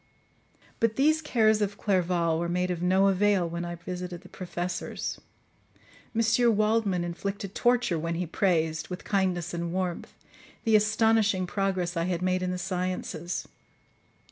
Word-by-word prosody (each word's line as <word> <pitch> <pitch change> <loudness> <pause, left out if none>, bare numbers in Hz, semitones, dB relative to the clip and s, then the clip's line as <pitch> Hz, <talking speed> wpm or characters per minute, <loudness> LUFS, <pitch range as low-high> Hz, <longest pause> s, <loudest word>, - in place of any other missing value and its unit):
But 225 -1 +2
these 310 +3 +3
cares 220 -7 +3
of 205 0 -1
Clerval 175 -4 +1
were 170 0 -1
made 180 +1 0
of 175 -1 -3
no 190 +2 +4
avail 195 -2 +3
when 170 +1 -4
I 175 0 -4
visited 180 0 -6
the 185 - -15
professors. 175 -1 -4 0.9
M. 230 0 +3
Waldman 215 -4 +2
inflicted 195 +3 -4
torture 240 -8 +2
when 165 +1 -2
he 180 +2 -1
praised, 160 -2 0
with 180 0 -6
kindness 180 -4 0
and 170 0 -3
warmth, 180 -1 -3 0.5
the 225 -2 +4
astonishing 215 -2 +3
progress 185 -1 -1
I 165 0 0
had 180 -1 -1
made 185 0 +1
in 185 - -1
the 180 - -2
sciences. 180 -2 -3
185 Hz, 145 wpm, -28 LUFS, 175-205 Hz, 0.9 s, no